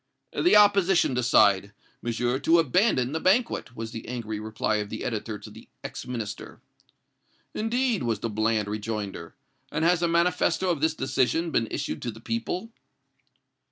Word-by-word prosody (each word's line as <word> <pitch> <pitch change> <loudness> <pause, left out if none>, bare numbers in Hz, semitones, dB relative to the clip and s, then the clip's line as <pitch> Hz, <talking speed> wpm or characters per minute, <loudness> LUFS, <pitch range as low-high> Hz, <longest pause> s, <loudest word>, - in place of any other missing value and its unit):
"The 355 - +3
opposition 200 -6 +5
decide, 105 -5 +3 0.3
Monsieur, 120 +2 -1
to 165 +4 +4
abandon 160 - +2
the 160 - -2
banquet," 190 - +1
was 115 0 -6
the 115 - -8
angry 115 -4 -4
reply 110 0 -1
of 105 -1 -3
the 110 - -5
editor 110 -2 -3
to - - -11
the - - -14 0.2
ex - - -7
Minister. 115 -5 -6 0.9
"Indeed!" 235 0 0
was 115 -3 0
the - - -1
bland 110 0 0
rejoinder; 105 -4 -5 0.4
"and 160 - 0
has 175 0 +3
a 170 - +2
manifesto 180 +2 +2
of 160 -5 -2
this 160 0 +2
decision 160 +5 0
been 115 -5 +1
issued - - -4
to 120 - -3
the 110 - -8
people?" 115 - -3
125 Hz, 155 wpm, -26 LUFS, 110-170 Hz, 0.9 s, opposition